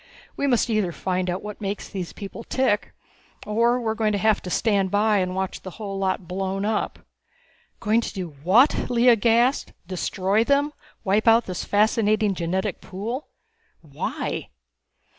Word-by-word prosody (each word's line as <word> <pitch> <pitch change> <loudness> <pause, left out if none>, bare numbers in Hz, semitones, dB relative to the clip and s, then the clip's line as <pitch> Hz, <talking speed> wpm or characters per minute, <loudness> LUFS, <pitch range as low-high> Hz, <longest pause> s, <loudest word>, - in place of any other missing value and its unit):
We 280 - 0
must 245 -4 +2
either 215 -6 +1
find 185 +1 -2
out 180 +2 -3
what 210 0 -7
makes 200 0 -3
these 185 -3 -5
people 205 +3 -8
tick 250 -6 0 0.5
or 235 +3 +2
we 240 - -6
are 220 - +1
going 220 -1 0
to - - +1
have 215 +1 +2
to 180 - -6
stand 200 -1 +1
by 210 +2 +3
and 185 -1 -1
watch 190 0 -3
the 185 - -7
whole 200 -3 -5
lot 190 -1 -1
blown 195 +2 -2
up!" 215 0 -2 0.7
"Going 220 +2 +2
to - - -4
do 185 -4 -5
what!" 225 - +4
Lea 240 0 +5
gasped. 235 +5 +2
"Destroy 190 +3 0
them? 285 +3 +2 0.3
Wipe 210 +2 +1
out 230 +1 +6
this 185 -2 -4
fascinating 215 0 +2
genetic 180 +1 -2
pool? 225 +9 -5 0.5
Why? 145 -3 -4
210 Hz, 160 wpm, -24 LUFS, 190-230 Hz, 0.7 s, out